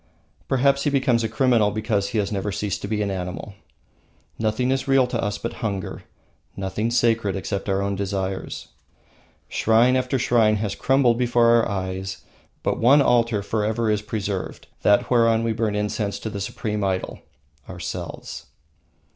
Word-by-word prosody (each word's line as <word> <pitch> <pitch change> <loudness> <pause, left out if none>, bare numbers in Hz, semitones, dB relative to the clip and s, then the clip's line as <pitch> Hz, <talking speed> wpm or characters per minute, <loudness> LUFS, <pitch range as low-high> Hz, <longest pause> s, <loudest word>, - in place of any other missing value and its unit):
Perhaps 140 +1 +2
he - - +3
becomes 130 -4 +2
a 110 - -1
criminal 115 -3 +3
because 105 -1 -1
he 110 - -3
has 100 -1 0
never 100 0 -2
ceased 100 0 -3
to - - -4
be 105 0 -1
an 100 - -2
animal. 90 +2 -5 0.9
Nothing 110 +4 0
is 135 +1 -1
real 135 -1 +4
to 120 -2 -2
us 105 -1 -1
but 115 - -5
hunger, 100 -5 -4 0.5
nothing 100 +4 -2
sacred 115 -4 +2
except 100 +1 -3
our 95 0 +1
own 100 0 -1
desires. 95 -1 -4 0.8
Shrine 115 +3 +3
after 130 +1 0
shrine 115 -3 +3
has 105 -1 -2
crumbled 130 -3 +2
before 120 -1 +3
our 115 -1 +4
eyes; 95 -1 -4 0.4
but - - 0
one 140 +5 +6
altar 115 -4 +2
is - - -11
forever 110 +1 0
preserved, 105 -2 -4 0.2
that 105 +4 +3
whereon 115 -2 +4
we 115 -1 0
burn 110 -2 -1
incense 105 0 -2
to 110 - -5
the 100 -1 -5
supreme 105 +1 -3
idol, 95 -1 -2 0.5
ourselves. - - -6
110 Hz, 160 wpm, -23 LUFS, 100-120 Hz, 0.9 s, one